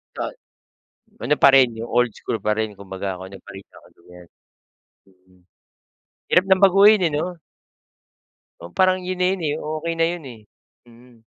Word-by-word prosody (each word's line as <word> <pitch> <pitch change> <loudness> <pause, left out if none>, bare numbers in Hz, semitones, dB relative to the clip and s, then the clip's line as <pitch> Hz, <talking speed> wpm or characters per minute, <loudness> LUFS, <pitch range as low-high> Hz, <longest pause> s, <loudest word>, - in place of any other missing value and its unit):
Ta - - -4 0.9
Ano 150 - +2
pa 140 - +9
rin, 125 -3 +4
'yong 115 +1 -7
old 120 -1 +1
school 115 - -4
pa 105 - -1
rin 110 -2 -4
kumbaga, 95 -1 -6
kung 95 - -9
ano 95 - -10
pa - - -14
rin 95 0 -11
yung - - -32
nakagawian. 90 0 -18 0.8
Mm. 95 0 -28 0.9
Hirap 180 +1 +4
ng 190 +1 +3
baguhin, 200 +2 +6
eh, - - -10
'no. 175 +5 -3 1.2
Oo, 85 +1 -11
parang 185 - +1
'yon 185 0 -5
na 180 - +2
'yon, 180 - -10
eh. 150 -1 -1
Okay 155 +2 -4
na 165 - +4
'yon, 175 -2 -5
eh. 110 - -14 0.5
Mm. 120 0 -20
125 Hz, 175 wpm, -21 LUFS, -, 1.2 s, pa